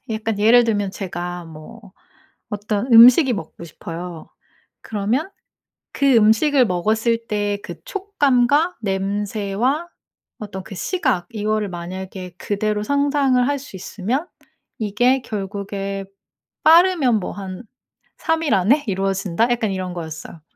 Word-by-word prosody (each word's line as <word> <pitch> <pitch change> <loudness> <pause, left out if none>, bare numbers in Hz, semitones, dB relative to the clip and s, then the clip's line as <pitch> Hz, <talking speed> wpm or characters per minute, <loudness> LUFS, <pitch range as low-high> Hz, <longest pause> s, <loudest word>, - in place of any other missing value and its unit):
약간 220 -1 -2
예를 235 +3 +6
들면 205 -3 0
제가 175 -2 -5
뭐 185 +7 -13 0.6
어떤 210 +3 -2
음식이 250 +4 +8
먹고 170 -3 -8
싶어요. 170 +1 -8 0.5
그러면 225 - -2 0.6
그 275 -2 +3
음식을 235 +5 +4
먹었을 220 +5 0
때 205 -1 -1
그 - - -7
촉감과 325 - +1
냄새와 205 - -1 0.5
어떤 200 -3 -7
그 195 - -10
시각, 260 - -1
이거를 215 -1 -1
만약에 180 +1 -7
그대로 210 +1 -2
상상을 280 -1 +2
할 285 0 0
수 265 -7 -11
있으면 220 - -3 0.5
"이게 245 +5 +2
결국에 195 -2 -5 0.6
빠르면 325 - +5
뭐 - - -4
한 190 +1 -7 0.5
3 325 0 0
일 300 - +1
안에 230 +11 +3
이루어진다." 195 +2 0
약간 230 -4 0
이런 185 -1 -4
거였어요. 160 -1 -8
210 Hz, 250 characters per minute, -21 LUFS, 195-255 Hz, 0.6 s, 음식이